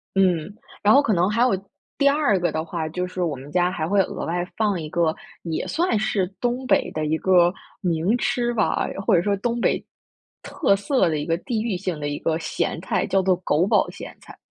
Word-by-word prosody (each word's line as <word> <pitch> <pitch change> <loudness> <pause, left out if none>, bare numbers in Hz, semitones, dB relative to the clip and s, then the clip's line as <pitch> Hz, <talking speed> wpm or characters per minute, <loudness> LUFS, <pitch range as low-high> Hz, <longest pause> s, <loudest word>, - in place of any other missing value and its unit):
嗯， 185 -1 +2 0.3
然 210 +1 +5
后 280 - +7
可 230 -7 +1
能 180 +2 +2
还 220 +3 0
有 255 - +4 0.5
第 280 - +3
二 280 -10 +2
个 175 - 0
的 160 0 -2
话 165 -1 -4
就 180 +3 -2
是 180 0 -5
我 155 -5 -1
们 135 +3 -11
家 180 +1 +2
还 155 -3 -3
会 200 +2 +2
额 - - -4
外 175 +1 -1
放 205 -6 +1
一 155 - -6
个 165 -1 +1 0.3
也 165 -2 -3
算 335 -6 +1
是 215 -4 0
东 245 +3 -1
北 - - +2
的 155 0 -2
一 155 +1 0
个 180 -1 +4 0.3
名 175 +5 +1
吃 240 0 0
吧， 220 -4 +1 0.2
或 215 - +4
者 170 - +4
说 200 +2 +1
东 235 +4 -2
北 - - +1 0.6
特 260 - +1
色 200 - +1
的 155 - -1
一 145 - -3
个 165 +1 0
地 225 +1 -2
域 225 -3 -1
性 180 -4 -3
的 145 - -3
一 145 0 -3
个 160 -1 0
咸 160 - -2
菜， - - -1
叫 195 - +2
做 185 -1 +2
“狗 165 +4 +2
宝 - - +3
咸 - - -9
菜”。 - - -14
185 Hz, 245 characters per minute, -23 LUFS, 165-220 Hz, 0.6 s, 后